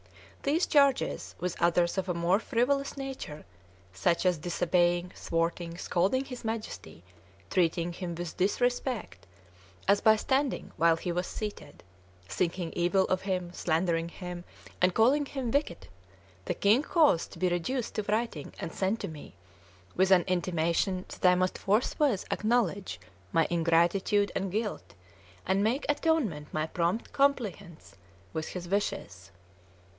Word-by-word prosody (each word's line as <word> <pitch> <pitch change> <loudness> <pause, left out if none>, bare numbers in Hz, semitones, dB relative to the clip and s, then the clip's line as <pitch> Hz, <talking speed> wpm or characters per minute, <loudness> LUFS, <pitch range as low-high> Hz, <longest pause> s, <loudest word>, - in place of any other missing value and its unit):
These 310 +6 +2
charges, 280 -3 +2
with 180 0 -3
others 170 +2 +2
of 190 0 -3
a 180 - 0
more 170 +4 +2
frivolous 275 +5 0
nature, 265 - -6 0.5
such 170 - +1
as 180 -3 +2
disobeying, 175 +1 +1
thwarting, 165 0 -2
scolding 195 +11 +1
his 250 -2 -8
Majesty, 215 - -5 0.5
treating 170 -1 +1
him 175 -1 -5
with 175 -1 -5
disrespect, 245 - -1 0.6
as 200 +1 +4
by 220 0 +6
standing 265 +5 -1
while 165 +1 +4
he 175 +2 -4
was 180 +1 -2
seated, 210 - -7 0.4
thinking 175 - -2
evil 180 +2 +2
of 185 - 0
him, 180 -2 -2
slandering 165 -1 0
him, 180 0 -7 0.4
and 180 0 +3
calling 275 +6 +4
him 265 -5 -3
wicked, 280 - -1 0.6
the - - -1
king 210 +6 +4
caused 300 - +3
to - - -11
be 185 - +1
reduced 200 +8 -1
to 215 - -2
writing 215 -9 -1
and 165 - -5
sent 195 +4 0
to - - -3
me, 150 - -10 0.6
with 190 +1 +3
an 185 -2 +6
intimation 180 +1 0
that 180 - +2
I 180 - +5
must 185 0 0
forthwith 220 +2 +1
acknowledge 210 - 0 0.3
my 165 -1 +3
ingratitude 175 +5 +2
and 195 -1 -2
guilt, 215 +2 -3 0.5
and 190 +2 +2
make 245 +7 0
atonement 290 - 0
by 155 0 -1
prompt 170 +6 -2
compliance 235 - -1 0.4
with 155 - -3
his 175 -1 -6
wishes. 100 - -2
185 Hz, 140 wpm, -29 LUFS, 170-225 Hz, 0.6 s, by